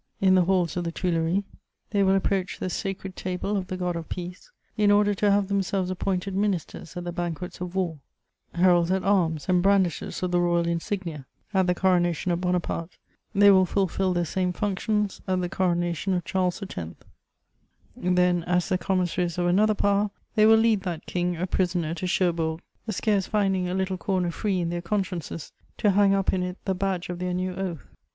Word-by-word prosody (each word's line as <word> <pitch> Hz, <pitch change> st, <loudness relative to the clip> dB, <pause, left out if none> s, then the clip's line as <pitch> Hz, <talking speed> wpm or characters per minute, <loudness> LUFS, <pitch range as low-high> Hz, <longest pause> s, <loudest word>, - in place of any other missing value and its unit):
in 190 Hz, -1 st, +4 dB
the 185 Hz, -2 st, +4 dB
halls 180 Hz, -3 st, +1 dB
of 180 Hz, -, -1 dB
the 170 Hz, -, -2 dB
Tuileries; 170 Hz, +2 st, 0 dB, 0.5 s
they 205 Hz, -2 st, +2 dB
will 195 Hz, 0 st, +4 dB
approach 195 Hz, -1 st, 0 dB
the 185 Hz, -, -3 dB
sacred 195 Hz, -1 st, -4 dB
table 185 Hz, +3 st, -3 dB
of 190 Hz, -2 st, -2 dB
the 185 Hz, -, -4 dB
God 180 Hz, -1 st, -2 dB
of 165 Hz, -1 st, -6 dB
Peace, 180 Hz, 0 st, -7 dB, 0.3 s
in 210 Hz, -1 st, +3 dB
order 205 Hz, 0 st, +4 dB
to 205 Hz, +1 st, +1 dB
have 200 Hz, -1 st, +3 dB
themselves 195 Hz, -1 st, 0 dB
appointed 185 Hz, +1 st, -2 dB
ministers 190 Hz, -4 st, -2 dB
at 175 Hz, -, -4 dB
the 175 Hz, -, -4 dB
banquets 175 Hz, +1 st, -5 dB
of 180 Hz, 0 st, -5 dB
war; 175 Hz, -5 st, -1 dB, 0.6 s
heralds 175 Hz, -1 st, +4 dB
at 190 Hz, 0 st, +1 dB
arms 170 Hz, -6 st, +1 dB
and 180 Hz, -1 st, +3 dB
brandishers 190 Hz, -2 st, +1 dB
of 180 Hz, -, -1 dB
the 175 Hz, -, +3 dB
royal 175 Hz, -1 st, +2 dB
insignia 170 Hz, -4 st, -3 dB, 0.3 s
at 190 Hz, -2 st, +3 dB
the 180 Hz, -, +2 dB
coronation 175 Hz, -2 st, +1 dB
of 170 Hz, 0 st, -1 dB
Bonaparte, 180 Hz, -1 st, -2 dB, 0.4 s
they 200 Hz, 0 st, +7 dB
will 190 Hz, -1 st, +5 dB
fulfil 190 Hz, 0 st, 0 dB
the 175 Hz, -1 st, 0 dB
same 180 Hz, +3 st, -1 dB
functions 210 Hz, +1 st, -1 dB
at 185 Hz, -1 st, +1 dB
the 180 Hz, -, -1 dB
coronation 175 Hz, 0 st, 0 dB
of 175 Hz, -2 st, -2 dB
Charles 185 Hz, +1 st, -1 dB
X.; 195 Hz, -, -8 dB, 1.2 s
then, 180 Hz, -1 st, +2 dB
as 180 Hz, 0 st, +1 dB
the 185 Hz, -, +1 dB
commissaries 180 Hz, -1 st, 0 dB
of 175 Hz, -, +1 dB
another 210 Hz, +5 st, +3 dB
power, 200 Hz, +1 st, +2 dB, 0.2 s
they 215 Hz, -1 st, +5 dB
will 220 Hz, 0 st, +7 dB
lead 220 Hz, -2 st, +3 dB
that 175 Hz, -4 st, -5 dB
King 175 Hz, -1 st, -1 dB
a 175 Hz, -, -1 dB
prisoner 175 Hz, -3 st, 0 dB
to 180 Hz, +2 st, -4 dB
Cherbourg, 165 Hz, -3 st, 0 dB, 0.3 s
scarce 205 Hz, -2 st, +1 dB
finding 195 Hz, -4 st, +1 dB
a 180 Hz, -, -2 dB
little 190 Hz, 0 st, -1 dB
corner 180 Hz, -2 st, 0 dB
free 190 Hz, +1 st, -1 dB
in 170 Hz, 0 st, -1 dB
their 175 Hz, 0 st, -3 dB
consciences 180 Hz, -4 st, -3 dB, 0.3 s
to 205 Hz, -, +3 dB
hang 195 Hz, 0 st, +4 dB
up 195 Hz, -1 st, +1 dB
in 185 Hz, -, 0 dB
it 180 Hz, +1 st, -4 dB
the 190 Hz, -, +1 dB
badge 185 Hz, -1 st, -2 dB
of 175 Hz, -1 st, -4 dB
their 180 Hz, 0 st, -2 dB
new 185 Hz, 0 st, -2 dB
oath. 180 Hz, -4 st, -4 dB
185 Hz, 195 wpm, -26 LUFS, 175-195 Hz, 1.2 s, they